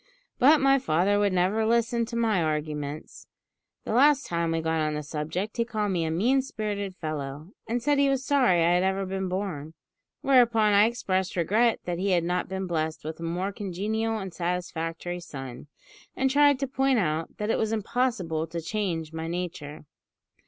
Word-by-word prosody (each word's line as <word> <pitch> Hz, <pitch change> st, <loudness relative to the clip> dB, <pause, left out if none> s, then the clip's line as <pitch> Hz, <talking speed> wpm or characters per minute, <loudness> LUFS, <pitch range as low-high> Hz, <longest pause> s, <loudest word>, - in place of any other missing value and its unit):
But 290 Hz, +4 st, +6 dB
my 275 Hz, 0 st, +4 dB
father 200 Hz, -1 st, +2 dB
would 205 Hz, -1 st, +2 dB
never 185 Hz, +5 st, +1 dB
listen 235 Hz, +1 st, +1 dB
to 235 Hz, -, -6 dB
my 225 Hz, -5 st, +2 dB
arguments. 150 Hz, -1 st, -4 dB, 0.6 s
The -, -, -3 dB
last 280 Hz, +3 st, +5 dB
time 170 Hz, -1 st, -1 dB
we 165 Hz, 0 st, 0 dB
got 160 Hz, 0 st, 0 dB
on 155 Hz, 0 st, -1 dB
the 150 Hz, -, -3 dB
subject 160 Hz, +9 st, -4 dB
he 235 Hz, -, +2 dB
called 215 Hz, -3 st, -2 dB
me 170 Hz, -3 st, 0 dB
a -, -, -1 dB
mean 235 Hz, +12 st, +2 dB
spirited 205 Hz, -6 st, -4 dB
fellow, 155 Hz, 0 st, -5 dB, 0.2 s
and 235 Hz, +1 st, -2 dB
said 290 Hz, +1 st, +2 dB
he 280 Hz, 0 st, +4 dB
was 270 Hz, -1 st, 0 dB
sorry 245 Hz, -12 st, +3 dB
I 170 Hz, -, +4 dB
had 180 Hz, -, +3 dB
ever 190 Hz, +1 st, 0 dB
been 190 Hz, 0 st, -3 dB
born; 175 Hz, -5 st, -4 dB, 0.5 s
whereupon 235 Hz, -5 st, +4 dB
I 200 Hz, +1 st, +6 dB
expressed 190 Hz, -5 st, -1 dB
regret 215 Hz, +7 st, +2 dB
that 175 Hz, -1 st, -3 dB
he 195 Hz, 0 st, +1 dB
had 175 Hz, -2 st, +2 dB
not 180 Hz, +1 st, -1 dB
been 190 Hz, 0 st, -3 dB
blessed 160 Hz, -3 st, -2 dB
with 160 Hz, +1 st, -5 dB
a -, -, -7 dB
more 180 Hz, +4 st, -2 dB
congenial 215 Hz, +4 st, -2 dB
and 190 Hz, -4 st, -6 dB
satisfactory 175 Hz, 0 st, -3 dB
son, 135 Hz, -6 st, -8 dB, 0.5 s
and 265 Hz, 0 st, +1 dB
tried 285 Hz, 0 st, +5 dB
to 275 Hz, -, 0 dB
point 270 Hz, 0 st, +1 dB
out 160 Hz, -5 st, -1 dB
that 210 Hz, +1 st, -1 dB
it -, -, 0 dB
was 220 Hz, 0 st, 0 dB
impossible 205 Hz, -8 st, -1 dB
to 170 Hz, +1 st, -5 dB
change 165 Hz, -3 st, -3 dB
my 160 Hz, 0 st, -4 dB
nature. 165 Hz, -4 st, -5 dB
190 Hz, 190 wpm, -27 LUFS, 165-225 Hz, 0.6 s, But